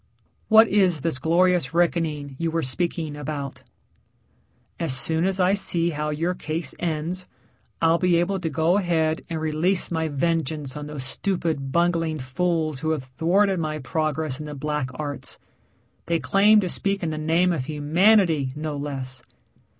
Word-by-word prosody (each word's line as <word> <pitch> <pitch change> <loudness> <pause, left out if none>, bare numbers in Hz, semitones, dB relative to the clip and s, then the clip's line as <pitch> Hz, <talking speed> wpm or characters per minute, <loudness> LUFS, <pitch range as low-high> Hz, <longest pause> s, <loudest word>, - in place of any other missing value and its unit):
"What 220 0 +7
is 185 -7 +2
this 160 -4 -1
glorious 170 -1 +2
reckoning 160 -5 0
you 165 0 0
were 165 0 -1
speaking 160 +2 -2
about?" 145 -1 -5 1.2
"As 150 -6 0
soon 160 +5 +2
as 190 0 +1
I 185 +1 +4
see 170 -4 +1
how 150 0 -3
your 165 +4 -1
case 155 -4 -3
ends, 175 +2 -2 0.6
I'll 165 +1 +4
be 180 -2 +3
able 175 +3 +1
to 165 -3 -2
go 160 +6 +2
ahead 160 -3 0
and 165 -1 -3
release 160 +5 +1
my 160 -1 0
vengeance 155 -2 -1
on 150 0 -6
those 150 -3 -5
stupid, 160 -3 -1
bungling 170 -1 +1
fools 155 +2 -1
who 160 +2 -2
have 155 -4 -1
thwarted 175 +9 +1
my 155 -1 -2
progress 155 0 -2
in 150 - -6
the 150 - -6
black 150 -1 -2
arts. 145 0 -5 0.7
They 170 - +2
claim 210 +5 +4
to 185 - -2
speak 195 +1 -1
in 160 - -1
the 155 - -4
name 170 +3 +2
of 130 -6 -3
humanity, 155 -1 +3
no 150 -1 -4
less!" 135 -3 -5
160 Hz, 160 wpm, -24 LUFS, 150-175 Hz, 1.2 s, What